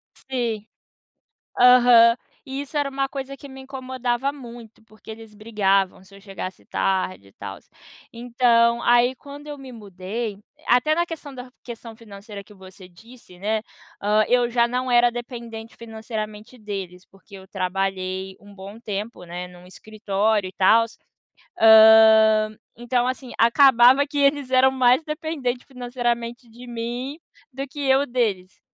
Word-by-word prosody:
Si 235 Hz, -5 st, -4 dB, 0.9 s
aham. 245 Hz, -2 st, +6 dB, 0.3 s
E 270 Hz, +1 st, -5 dB
isso 285 Hz, +1 st, -6 dB
era 290 Hz, -1 st, 0 dB
uma 270 Hz, 0 st, -2 dB
coisa 275 Hz, 0 st, -6 dB
que 280 Hz, 0 st, -13 dB
me 265 Hz, 0 st, -11 dB
incomodava 260 Hz, -1 st, -3 dB
muito, 235 Hz, -6 st, -13 dB
porque 215 Hz, +1 st, -14 dB
eles 220 Hz, -1 st, -12 dB
brigavam 200 Hz, -4 st, 0 dB
se 190 Hz, +1 st, -18 dB
eu 200 Hz, -, -16 dB
chegasse 195 Hz, -2 st, -8 dB
tarde 185 Hz, -, -2 dB
e -, -, -27 dB
tal. -, -, -8 dB, 0.6 s
Então 235 Hz, 0 st, +2 dB
aí 240 Hz, +2 st, +3 dB
quando 285 Hz, +2 st, -12 dB
eu 295 Hz, -1 st, -7 dB
me 270 Hz, -2 st, -11 dB
mudei 205 Hz, +1 st, -6 dB, 0.3 s
até 250 Hz, +6 st, +3 dB
na 345 Hz, +1 st, +1 dB
questão 320 Hz, -4 st, -9 dB
da 250 Hz, 0 st, -9 dB
questão 230 Hz, -1 st, -9 dB
financeira 205 Hz, -2 st, -11 dB
que 210 Hz, -, -18 dB
você 190 Hz, -1 st, -14 dB
disse, 205 Hz, +1 st, -17 dB
né, 215 Hz, +3 st, -2 dB, 0.4 s
hã, 210 Hz, +1 st, +2 dB
eu 245 Hz, -1 st, +2 dB
já 235 Hz, 0 st, +2 dB
não 250 Hz, +1 st, -3 dB
era 240 Hz, 0 st, +4 dB
dependente 235 Hz, -2 st, -8 dB
financeiramente 220 Hz, 0 st, -8 dB
deles, 195 Hz, -4 st, -7 dB
porque 195 Hz, +1 st, -18 dB
eu 190 Hz, 0 st, -13 dB
trabalhei 190 Hz, 0 st, -3 dB
um 205 Hz, 0 st, -16 dB
bom 200 Hz, +3 st, -11 dB
tempo, 210 Hz, -2 st, -6 dB
né, 175 Hz, +1 st, -7 dB
num 180 Hz, 0 st, -16 dB
escritório 210 Hz, +1 st, -2 dB
e 185 Hz, -, -11 dB
tal. 225 Hz, +4 st, +4 dB, 0.7 s
Hã, 220 Hz, -1 st, +6 dB, 0.2 s
então 240 Hz, +1 st, -1 dB
assim, 255 Hz, -1 st, -5 dB
acabava 255 Hz, +2 st, +5 dB
que 290 Hz, 0 st, -6 dB
eles 280 Hz, -1 st, +1 dB
eram 260 Hz, +1 st, +4 dB
mais 255 Hz, +2 st, +3 dB
dependentes 305 Hz, -6 st, -4 dB
financeiramente 240 Hz, -2 st, -4 dB
de 240 Hz, +2 st, -13 dB
mim 240 Hz, +4 st, -5 dB, 0.4 s
do 270 Hz, +2 st, -5 dB
que 290 Hz, +2 st, -11 dB
eu 270 Hz, 0 st, +2 dB
deles. 215 Hz, -8 st, -2 dB
235 Hz, 150 wpm, -22 LUFS, 205-255 Hz, 0.9 s, aham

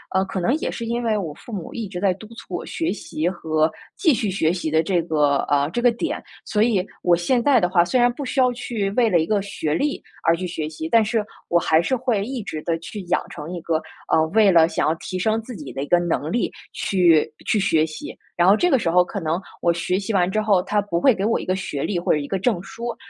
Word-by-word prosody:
呃， 190 Hz, -, +4 dB
可 190 Hz, -, -4 dB
能 205 Hz, +8 st, +1 dB
也 -, -, -3 dB
是 230 Hz, -, -5 dB
因 235 Hz, +1 st, -2 dB
为 220 Hz, -2 st, +1 dB
我 170 Hz, -7 st, -4 dB
父 235 Hz, -, -13 dB
母 195 Hz, -6 st, -6 dB
一 225 Hz, -3 st, -4 dB
直 180 Hz, -2 st, -6 dB
在 190 Hz, -1 st, +2 dB
督 215 Hz, +3 st, -12 dB
促 230 Hz, -, -8 dB
我 -, -, -5 dB
学 330 Hz, -, -2 dB
习 165 Hz, -5 st, -3 dB
和 160 Hz, -3 st, 0 dB, 0.3 s
继 325 Hz, -6 st, +4 dB
续 215 Hz, -4 st, -1 dB
学 165 Hz, -4 st, +1 dB
习 175 Hz, -4 st, -3 dB
的 160 Hz, +1 st, +4 dB
这 175 Hz, +1 st, +1 dB
个， 150 Hz, -4 st, +2 dB
呃， 145 Hz, 0 st, +2 dB
这 240 Hz, -, -1 dB
个 245 Hz, 0 st, +5 dB
点， 240 Hz, +8 st, -3 dB, 0.2 s
所 210 Hz, 0 st, +1 dB
以 210 Hz, -6 st, +2 dB, 0.2 s
我 175 Hz, -1 st, +5 dB
现 175 Hz, +9 st, +1 dB
在 275 Hz, -2 st, +5 dB
的 180 Hz, -, +1 dB
话 175 Hz, -2 st, +4 dB
虽 215 Hz, +9 st, +1 dB
然 245 Hz, 0 st, +4 dB
不 285 Hz, -, -6 dB
需 265 Hz, -, -2 dB
要 255 Hz, -1 st, +4 dB
去 230 Hz, -4 st, -3 dB
为 230 Hz, +2 st, +3 dB
了 175 Hz, -4 st, +3 dB
一 160 Hz, -, +1 dB
个 210 Hz, -2 st, +1 dB
学 195 Hz, -6 st, -3 dB
历 285 Hz, -, -1 dB, 0.2 s
而 165 Hz, -, +4 dB
去 180 Hz, +2 st, -4 dB
学 160 Hz, -3 st, -4 dB
习。 160 Hz, 0 st, -6 dB
但 230 Hz, +3 st, +5 dB
是 220 Hz, 0 st, 0 dB, 0.3 s
我 170 Hz, -, +4 dB
还 160 Hz, -1 st, +3 dB
是 260 Hz, +10 st, 0 dB
会 240 Hz, -5 st, 0 dB
一 255 Hz, 0 st, -4 dB
直 155 Hz, -6 st, -5 dB
地 165 Hz, -1 st, 0 dB
去 200 Hz, +5 st, -7 dB
养 175 Hz, -, 0 dB
成 150 Hz, +1 st, -8 dB
一 175 Hz, -, -4 dB
个， 160 Hz, -1 st, -1 dB, 0.3 s
呃， 160 Hz, -, +4 dB
为 215 Hz, +2 st, +5 dB
了 165 Hz, -2 st, +6 dB
想 160 Hz, -2 st, 0 dB
要 160 Hz, -, +2 dB
提 185 Hz, +3 st, -5 dB
升 220 Hz, +4 st, +1 dB
自 240 Hz, +2 st, -9 dB
己 150 Hz, -8 st, -8 dB
的 135 Hz, +2 st, -3 dB
一 -, -, -6 dB
个 175 Hz, -, +4 dB
能 165 Hz, -3 st, -1 dB
力 235 Hz, -, 0 dB, 0.2 s
去 170 Hz, -5 st, +3 dB, 0.2 s
去 220 Hz, -, +2 dB
学 165 Hz, -6 st, +3 dB
习。 155 Hz, -1 st, -8 dB, 0.2 s
然 175 Hz, -, +4 dB
后 195 Hz, -, +7 dB
这 355 Hz, +10 st, +2 dB
个 265 Hz, -, +4 dB
时 170 Hz, -, 0 dB
候 180 Hz, +2 st, +5 dB
可 200 Hz, +3 st, -5 dB
能 165 Hz, 0 st, -1 dB, 0.2 s
我 170 Hz, -, +3 dB
学 180 Hz, +2 st, -1 dB
习 205 Hz, +2 st, -3 dB
完 180 Hz, -2 st, +2 dB
之 215 Hz, -, 0 dB
后， 205 Hz, -4 st, +3 dB
它 205 Hz, +2 st, +1 dB
不 200 Hz, -4 st, -2 dB
会 265 Hz, -, +6 dB
给 195 Hz, -1 st, -2 dB
我 225 Hz, -, +2 dB
一 -, -, -6 dB
个 185 Hz, -, 0 dB
学 185 Hz, -7 st, -4 dB
历 185 Hz, -4 st, -1 dB
或 170 Hz, -, 0 dB
者 -, -, +2 dB
一 145 Hz, -1 st, -4 dB
个 195 Hz, -, -2 dB
证 200 Hz, -3 st, 0 dB
书， 235 Hz, +3 st, -6 dB
190 Hz, 295 characters per minute, -22 LUFS, 165-225 Hz, 0.3 s, 后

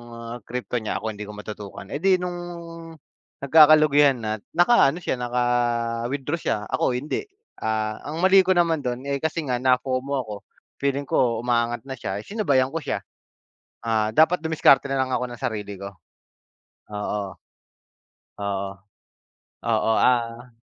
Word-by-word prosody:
ah, 115 Hz, +1 st, -7 dB
crypto 125 Hz, 0 st, -3 dB
niya, 110 Hz, -, -2 dB
ako 110 Hz, -1 st, -3 dB
hindi 105 Hz, -, -10 dB
ko 105 Hz, -, -8 dB
matutukan. 105 Hz, -1 st, -8 dB
Eh, 145 Hz, -, -3 dB
di 190 Hz, -1 st, +4 dB
nung 175 Hz, -1 st, -3 dB, 1.1 s
nagkakalugihan 150 Hz, -2 st, +6 dB
na, 110 Hz, 0 st, -2 dB, 0.2 s
naka-ano 175 Hz, -4 st, +4 dB
siya, 130 Hz, -, -2 dB
naka-withdraw 120 Hz, +3 st, -1 dB
siya, -, -, 0 dB
ako 125 Hz, -, +1 dB
hindi. 145 Hz, -, -3 dB, 0.4 s
Ah, 110 Hz, -1 st, -2 dB
ang 160 Hz, +3 st, -4 dB
mali 190 Hz, 0 st, +7 dB
ko 185 Hz, -, +4 dB
naman 165 Hz, -3 st, +2 dB
do'n, 125 Hz, +2 st, -3 dB
eh, 140 Hz, -1 st, -2 dB
kasi 160 Hz, 0 st, -2 dB
nga 125 Hz, -2 st, 0 dB
na-FOMO 130 Hz, +2 st, +1 dB
ako, 105 Hz, -3 st, -7 dB, 0.5 s
feeling 140 Hz, 0 st, 0 dB
ko 120 Hz, -4 st, +1 dB
umaangat 120 Hz, -1 st, +1 dB
na 135 Hz, -, -4 dB
siya, 95 Hz, -3 st, -4 dB
sinabayan 140 Hz, -, +1 dB
ko 165 Hz, -, -2 dB
siya. -, -, -3 dB, 0.8 s
Ah, 110 Hz, -1 st, +1 dB
dapat 160 Hz, +1 st, +4 dB
dumiskarte 155 Hz, -4 st, +4 dB
na 135 Hz, -, 0 dB
lang 130 Hz, -, -1 dB
ako 125 Hz, -, 0 dB
ng 120 Hz, -, -10 dB
sarili 105 Hz, -5 st, -3 dB
ko. 100 Hz, +1 st, -7 dB, 1.0 s
Oo. 105 Hz, -2 st, -4 dB, 1.0 s
Oo. 100 Hz, -1 st, -2 dB, 1.0 s
Oo, 110 Hz, -, +2 dB, 0.2 s
ah 120 Hz, 0 st, -3 dB
125 Hz, 145 wpm, -24 LUFS, 115-145 Hz, 1.1 s, mali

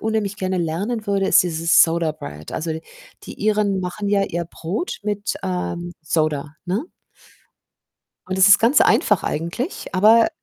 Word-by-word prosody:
unheimlich 215 Hz, -2 st, -2 dB
gerne 185 Hz, -2 st, -2 dB
lernen 200 Hz, +8 st, -3 dB
würde, 195 Hz, -1 st, +1 dB
ist -, -, +5 dB
dieses 165 Hz, -1 st, +4 dB
Soda 165 Hz, -1 st, +1 dB
Bread. 75 Hz, -, -10 dB
Also, 160 Hz, 0 st, -3 dB
d 160 Hz, 0 st, -4 dB, 0.4 s
die -, -, -9 dB
Iren 210 Hz, -2 st, +1 dB
machen 185 Hz, +3 st, -4 dB
ja 200 Hz, -1 st, +2 dB
ihr 170 Hz, -3 st, -3 dB
Brot 175 Hz, -, -5 dB
mit, 205 Hz, 0 st, -2 dB
ähm, 175 Hz, -2 st, -3 dB
Soda, 155 Hz, -2 st, -1 dB
ne? 200 Hz, -, -1 dB, 1.4 s
Und 185 Hz, 0 st, -3 dB
das 190 Hz, -, +6 dB
ist 200 Hz, 0 st, +8 dB
ganz 235 Hz, +6 st, +4 dB
einfach -, -, +3 dB
eigentlich, 170 Hz, -, -4 dB
aber 220 Hz, +4 st, +5 dB
185 Hz, 155 wpm, -21 LUFS, 165-205 Hz, 1.4 s, ist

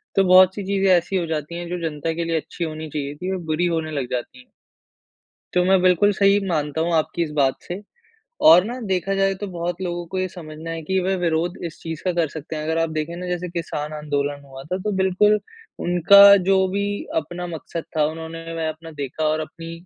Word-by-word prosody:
तो 195 Hz, -, +5 dB
बहुत-सी 185 Hz, +2 st, +5 dB
चीज़ें 195 Hz, 0 st, +2 dB
ऐसी 175 Hz, +3 st, -3 dB
हो 180 Hz, -2 st, +1 dB
जाती 155 Hz, +1 st, -3 dB
है 175 Hz, 0 st, -5 dB
जो 180 Hz, 0 st, -3 dB
जनता 155 Hz, +2 st, -3 dB
के 170 Hz, +1 st, -2 dB
लिए 165 Hz, 0 st, -1 dB
अच्छी 170 Hz, -, -5 dB
होनी 155 Hz, -1 st, -5 dB
चाहिए 145 Hz, -1 st, -4 dB
थी, 185 Hz, +5 st, -3 dB
बुरी 160 Hz, +2 st, 0 dB
होने 165 Hz, -2 st, -1 dB
लग 140 Hz, -4 st, -2 dB
जाती 125 Hz, 0 st, -5 dB, 1.1 s
तो 180 Hz, -, +4 dB
मैं 190 Hz, 0 st, +4 dB
बिल्कुल 185 Hz, +3 st, +4 dB
सही 200 Hz, +1 st, +4 dB
मानता 150 Hz, -2 st, -1 dB
हूँ 170 Hz, +1 st, 0 dB
आपकी 160 Hz, +2 st, 0 dB
इस 160 Hz, -, -2 dB
बात 135 Hz, -2 st, +3 dB
से। 180 Hz, +3 st, -6 dB, 0.6 s
और 170 Hz, +3 st, +8 dB
ना 245 Hz, +3 st, -5 dB
देखा 195 Hz, 0 st, -1 dB
जाए 195 Hz, 0 st, +2 dB
तो 205 Hz, -, -3 dB
बहुत 175 Hz, -1 st, -3 dB
लोगों 175 Hz, -1 st, -3 dB
को -, -, -1 dB
ये 185 Hz, -, 0 dB
समझना 160 Hz, -2 st, -9 dB
है 165 Hz, 0 st, -4 dB
कि 190 Hz, +4 st, 0 dB
वे 190 Hz, +1 st, +1 dB
विरोध 170 Hz, 0 st, 0 dB
इस 160 Hz, -2 st, -7 dB
चीज़ 160 Hz, -1 st, -6 dB
का 185 Hz, -, +1 dB
कर 170 Hz, -2 st, +1 dB
सकते 155 Hz, +1 st, -7 dB
हैं 155 Hz, -, -4 dB
अगर 160 Hz, +1 st, -1 dB
आप 165 Hz, 0 st, +1 dB
देखे 155 Hz, +2 st, -3 dB
ना 180 Hz, +1 st, -6 dB
जैसे 180 Hz, 0 st, -3 dB
किसान 155 Hz, -3 st, -4 dB
आंदोलन 145 Hz, -1 st, -2 dB
हुआ 135 Hz, -1 st, -10 dB
था 185 Hz, -, +1 dB
तो 210 Hz, -, +1 dB
बिल्कुल 190 Hz, +3 st, +3 dB, 0.5 s
उनका 200 Hz, +3 st, +8 dB
जो 195 Hz, -, +5 dB, 0.2 s
भी 200 Hz, 0 st, 0 dB, 0.4 s
अपना 175 Hz, +4 st, -7 dB
मकसद 165 Hz, 0 st, -6 dB
था 150 Hz, -, +4 dB
उन्होंने 160 Hz, +1 st, -6 dB
वह 165 Hz, -1 st, -2 dB
अपना 160 Hz, +1 st, -9 dB
देखा 140 Hz, +3 st, -3 dB
और 155 Hz, +1 st, +1 dB
अपनी 165 Hz, +1 st, -7 dB
170 Hz, 220 wpm, -22 LUFS, 155-185 Hz, 1.1 s, और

